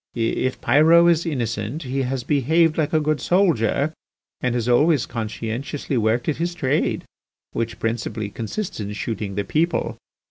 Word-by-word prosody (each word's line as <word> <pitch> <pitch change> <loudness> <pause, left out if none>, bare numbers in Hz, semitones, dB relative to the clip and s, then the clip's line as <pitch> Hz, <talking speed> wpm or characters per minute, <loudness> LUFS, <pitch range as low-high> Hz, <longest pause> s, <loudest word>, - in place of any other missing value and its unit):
If 120 +2 -1
Pyrot 160 +6 +6
is 170 +1 0
innocent 120 0 -2
he 135 +1 -2
has 130 -1 -2
behaved 155 +4 +2
like 155 -3 0
a 155 - +3
good 155 -1 0
soldier 155 - +2 0.5
and 125 -1 0
has 120 -1 -1
always 145 +2 +4
conscientiously 115 +5 -4
worked 115 +1 +1
at 155 - 0
his 175 +1 -2
trade, 145 -2 0 0.5
which 115 -1 -3
principally 110 -2 -2
consists 120 - -4
in 105 0 -4
shooting 105 -2 -4
the 100 - 0
people. 165 - 0
130 Hz, 150 wpm, -22 LUFS, 115-155 Hz, 0.5 s, Pyrot